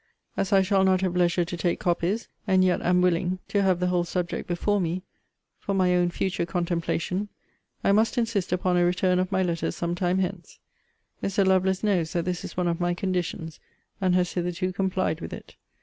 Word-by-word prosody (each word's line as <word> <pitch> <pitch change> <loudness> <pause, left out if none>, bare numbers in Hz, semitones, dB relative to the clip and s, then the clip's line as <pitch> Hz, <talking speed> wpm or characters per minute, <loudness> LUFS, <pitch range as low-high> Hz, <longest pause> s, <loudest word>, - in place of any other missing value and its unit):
As 195 - -1
I 195 -1 +5
shall 190 0 +2
not 190 -1 +3
have 185 -2 -1
leisure 175 0 +2
to 175 - -5
take 170 +1 -1
copies, 180 +4 0 0.2
and 190 -1 +4
yet 180 - +2
am 180 0 +3
willing 180 +1 +1
to 200 - +2
have 185 -3 +2
the 180 - 0
whole 180 -1 +1
subject 175 0 -3
before 200 +3 0
me, 175 +1 -2 0.6
for 200 - -2
my 185 -1 +3
own 175 0 +3
future 180 0 -1
contemplation, 175 +3 -2 0.5
I - - +3
must 220 +5 +2
insist 225 -7 0
upon 180 0 +1
a 175 - +4
return 180 +1 +2
of 185 +1 -1
my 190 0 +2
letters 170 -2 -1
some 170 0 -2
time 180 +1 0
hence. 185 -1 -3 0.6
Mr. 195 0 +1
Lovelace 190 0 +2
knows 180 -6 +1
that 170 -1 -1
this 180 -1 -2
is - - -8
one 180 -1 +1
of 170 -1 -1
my 175 0 0
conditions; 175 -4 -3 0.4
and 185 -1 +3
has 180 -1 +1
hitherto 180 +1 -2
complied 190 -3 -1
with 80 - -6
it. - - -10
180 Hz, 200 wpm, -26 LUFS, 175-190 Hz, 0.6 s, I